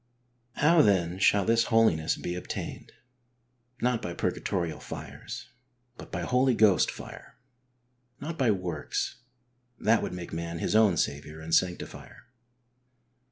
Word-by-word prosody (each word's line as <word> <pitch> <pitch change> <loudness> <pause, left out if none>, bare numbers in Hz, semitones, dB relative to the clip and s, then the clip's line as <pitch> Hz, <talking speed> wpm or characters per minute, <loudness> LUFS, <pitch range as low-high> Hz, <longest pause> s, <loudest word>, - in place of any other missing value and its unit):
Ho\v 160 +2 +5
then 90 -4 +2
shall 100 0 +4
this 115 0 +3
holiness 110 -9 +3
be 85 - -4
obtained? 90 - -6 0.9
Not 125 -1 +1
by 85 - -5
purgatorial 85 -3 -2
fires, - - -8 0.5
but - - -12
by - - -3
Holy 125 0 +2
Ghost 105 -5 +4
fire. - - -10 0.8
Not 160 +3 -5
by 130 -7 +2
works; 90 -7 -2 0.6
that 110 +1 +3
would - - -4
make 90 -2 -7
man 85 +1 -4
his - - -1
owm 105 -5 +5
Saviour 75 +2 -2
and 80 +1 -6
sanctifier. 90 -1 -1
95 Hz, 125 wpm, -28 LUFS, 85-115 Hz, 0.9 s, Ho\v